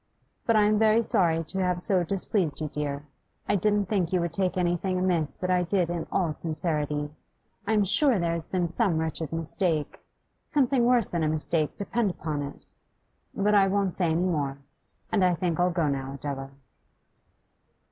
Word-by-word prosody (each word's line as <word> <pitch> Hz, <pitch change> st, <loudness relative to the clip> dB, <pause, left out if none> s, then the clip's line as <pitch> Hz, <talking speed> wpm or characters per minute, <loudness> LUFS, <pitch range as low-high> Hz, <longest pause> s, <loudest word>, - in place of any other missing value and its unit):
But 230 Hz, -, +3 dB
I 210 Hz, -, +5 dB
am 210 Hz, 0 st, +3 dB
very 220 Hz, +1 st, +4 dB
sorry 165 Hz, -6 st, +2 dB
to 190 Hz, +5 st, -4 dB
have 180 Hz, -1 st, 0 dB
so 180 Hz, 0 st, +1 dB
displeased 185 Hz, -2 st, 0 dB
you, 155 Hz, -1 st, -3 dB
dear. 145 Hz, 0 st, -4 dB, 0.4 s
I 205 Hz, -, +2 dB
didn't 205 Hz, +1 st, +1 dB
think 185 Hz, -4 st, -1 dB
you 185 Hz, -, +2 dB
would 170 Hz, -1 st, -3 dB
take 185 Hz, 0 st, 0 dB
anything 180 Hz, +1 st, 0 dB
amiss 175 Hz, -5 st, 0 dB
that 185 Hz, 0 st, -2 dB
I 180 Hz, 0 st, +3 dB
did 175 Hz, -1 st, 0 dB
in 170 Hz, -2 st, -4 dB
all 175 Hz, -5 st, 0 dB
sincerity. 150 Hz, -2 st, -2 dB, 0.6 s
I 220 Hz, -, +1 dB
am 210 Hz, -2 st, +3 dB
sure 260 Hz, -, +5 dB
there 170 Hz, -2 st, 0 dB
has 170 Hz, -1 st, -3 dB
been 180 Hz, 0 st, -1 dB
some 170 Hz, 0 st, +1 dB
wretched 160 Hz, -1 st, -2 dB
mistake, 165 Hz, -1 st, -1 dB, 0.5 s
something 265 Hz, -4 st, +2 dB
worse 240 Hz, -4 st, +3 dB
than 170 Hz, -, -2 dB
a 155 Hz, -, +1 dB
mistake, 155 Hz, 0 st, -1 dB
depend 210 Hz, +1 st, -1 dB
upon 155 Hz, -4 st, -4 dB
it. 140 Hz, 0 st, -8 dB, 0.7 s
But 205 Hz, +1 st, +1 dB
I 200 Hz, -1 st, +5 dB
won't 195 Hz, -1 st, 0 dB
say 180 Hz, -, +1 dB
any 165 Hz, +2 st, +1 dB
more. 145 Hz, -6 st, -1 dB, 0.5 s
And 200 Hz, -, +2 dB
I 180 Hz, -1 st, +3 dB
think 170 Hz, 0 st, -2 dB
I'll 180 Hz, +1 st, +3 dB
go 170 Hz, -3 st, 0 dB
now, 135 Hz, -1 st, -3 dB
Adela. 135 Hz, -1 st, -5 dB
175 Hz, 185 wpm, -26 LUFS, 155-195 Hz, 0.7 s, I